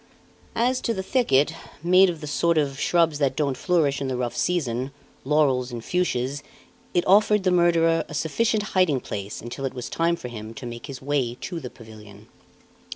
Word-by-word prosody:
As 250 +2 +1
to 230 - -1
the 190 - -3
thicket, 160 - +2 0.3
made 185 +2 +6
of 165 -2 -5
the - - -5
sort 170 +3 +1
of 140 -2 0
shrubs 165 -3 +2
that 135 -2 +1
don't 140 -3 0
flourish 150 -4 +1
in 135 - -1
the 130 -1 -2
rough 125 -1 -2
season 130 -8 -1 0.3
laurels 135 -3 +2
and 120 -2 -6
fuchsias 140 -6 -1 0.5
it 175 - +2
offered 210 +1 +4
the 185 - +2
murderer 165 -2 +3
a 150 - -6
sufficient 210 +8 0
hiding 185 -8 +3
place 100 -4 -6
until 120 +4 -6
it 135 -1 -3
was 125 -2 -6
time 170 +1 +1
for 170 - -8
him 110 -1 -8
to 140 - -8
make 120 -1 -7
his 135 -2 -8
way 135 -4 0
to 175 -2 -4
the 130 -5 -7
pavilion. 110 -3 -14
145 Hz, 190 wpm, -24 LUFS, 125-175 Hz, 0.5 s, made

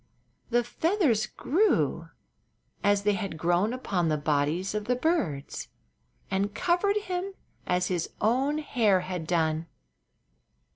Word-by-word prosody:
The 240 0 +2
feathers 250 - +1
grew 390 +10 +1 0.7
as 205 0 +3
they 210 0 +3
had 195 -5 -4
grown 175 +6 +2
upon 190 -9 -1
the 155 - +1
bodies 150 +6 0
of 210 -1 -2
the 250 - +1
birds 250 - -1 0.6
and 200 +2 0
covered 380 +4 +2
him 380 -1 -3 0.3
as 180 0 +1
his 175 -3 -1
own 265 +7 +2
hair 225 -11 +2
had 180 -3 -5
done. 160 -1 0
205 Hz, 125 wpm, -28 LUFS, 175-285 Hz, 0.7 s, as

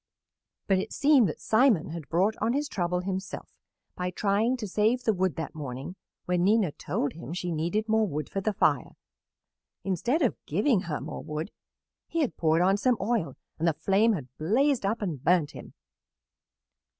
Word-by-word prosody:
But 195 -2 +2
it - - -4
seemed 280 - +4
that - - -6
Simon 220 - +3
had 165 -4 -7
brought 190 +6 +2
on 225 +3 +1
his 290 +2 0
trouble 180 -6 -1
himself 190 +1 -5 0.4
by 180 0 -2
trying 210 +7 +1
to 220 -4 -5
save 220 +6 +1
the 220 - +2
wood 185 -5 0
that 160 - -5
morning 140 +2 -6 0.3
when 180 -1 +1
Nina 205 -3 +3
told 145 - -2
him 165 0 -8
she 180 0 -3
needed 175 +8 -1
more 220 -1 +2
wood 150 -3 -3
for 195 - -3
the 215 - 0
fire. - - +1 0.9
Instead 240 - 0
of 245 - -1
giving 210 - +2
her 150 - -1
more - - -6
wood 155 +5 -5 0.6
he 335 - -1
had 280 - -1
poured 160 +1 +2
on 195 +2 +3
some 250 +3 +2
oil 210 -4 -1 0.2
and 165 - +1
the 165 - +3
flame 200 +8 +2
had 130 -9 -6
blazed 235 - +2
up 220 +2 -1
and 155 -9 -4
burnt 170 -3 +3
him. - - -11
195 Hz, 180 wpm, -28 LUFS, 165-220 Hz, 0.9 s, seemed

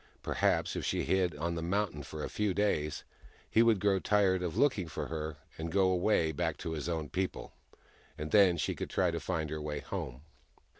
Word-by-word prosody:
Perhaps, - - +1
if - - -3
she - - 0
hid 90 -4 +1
on 85 +3 -2
the 85 - -3
mountain 90 -2 -1
for 75 +2 -7
a - - -2
few 105 -3 -1
days 75 -8 0 0.4
he 110 - +4
would 115 -3 +4
grow 100 -1 +3
tired 95 -2 +3
of 90 -3 -3
looking 130 - +2
for - - -5
her, 80 -2 -4 0.2
and 80 +1 -3
go 95 0 +3
away, 90 -3 +2
back 80 0 -1
to 85 - -5
his 80 +1 -3
own 80 -3 -2
people; 95 +4 -3 0.6
and 75 +1 -5
then 95 -5 +6
she 75 - 0
could - - -5
try - - +2
to - - -2
find 80 -2 -2
her 80 -1 -3
way 75 -1 -3
home. 65 -1 -5
85 Hz, 205 wpm, -32 LUFS, 75-95 Hz, 0.6 s, then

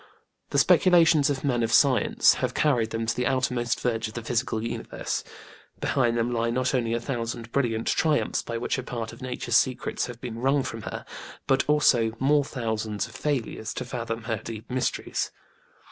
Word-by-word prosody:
The - - -1
speculations 165 -5 +5
of 140 -2 -2
men 125 -4 +1
of 115 -1 0
science 130 +1 +4
have - - -1
carried 125 -7 +2
them 115 0 -2
to 115 - 0
the 125 0 0
outermost 125 -3 0
verge 115 -2 -1
of 110 - -11
the 120 - -4
physical 115 -1 -1
universe. 115 - -4 0.6
Behind 120 -4 +1
them 120 +1 0
lie 115 0 0
not 130 +2 0
only 115 -3 +1
a - - 0
thousand 115 -2 -4
brilliant 115 -4 0
triumphs 155 -2 +1
by 115 - -4
which 120 - -1
a - - -2
part 115 -3 -5
of 115 - -13
Nature's 125 -1 0
secrets 130 -2 0
have 120 -2 -9
been 120 -2 -6
wrung 135 +2 +2
from 115 -2 -5
her, - - -6 0.4
but 135 0 +2
also 120 -7 +4
more 145 +3 +3
thousands 110 -5 -3
of - - -15
failures 125 -6 -2
to - - -4
fathom 115 -2 -4
her 110 -1 -2
deep 115 0 -7
mysteries. 125 -1 -1
120 Hz, 185 wpm, -26 LUFS, 115-130 Hz, 0.6 s, speculations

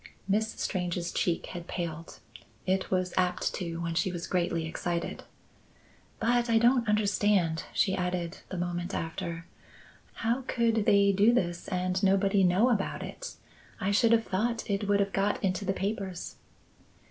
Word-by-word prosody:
Miss 215 +3 +1
Strange's 175 -2 -2
cheek 170 -2 0
had 175 -1 -7
paled. 165 -1 -5 0.4
It 190 0 0
was 185 -1 0
apt 180 -1 +1
to 170 -3 -4
when 170 -1 -2
she 180 +2 +1
was 175 -1 -4
greatly 170 -2 0
excited. 170 +1 -3 0.9
"But 240 +1 +2
I 230 - +4
don't 240 0 +4
understand," 205 -5 +2
she 190 - +2
added, 180 -1 -2
the 185 - -5
moment 175 +1 -3
after. 165 0 -4 0.8
"How 235 +4 +2
could 230 -3 +1
they 200 0 +5
do 200 +4 +5
this 175 -8 -1
and 185 0 -1
nobody 195 0 +3
know 185 +7 +4
about 205 -5 -1
it? - - -7 0.4
I 200 -1 0
should 225 +3 +4
have 230 -1 +4
thought 230 +5 -1
it 200 0 -1
would 200 0 +3
have 200 0 -1
got 200 +2 0
into 190 +1 0
the 195 - +1
papers." 195 -2 -4
190 Hz, 155 wpm, -29 LUFS, 175-210 Hz, 0.9 s, they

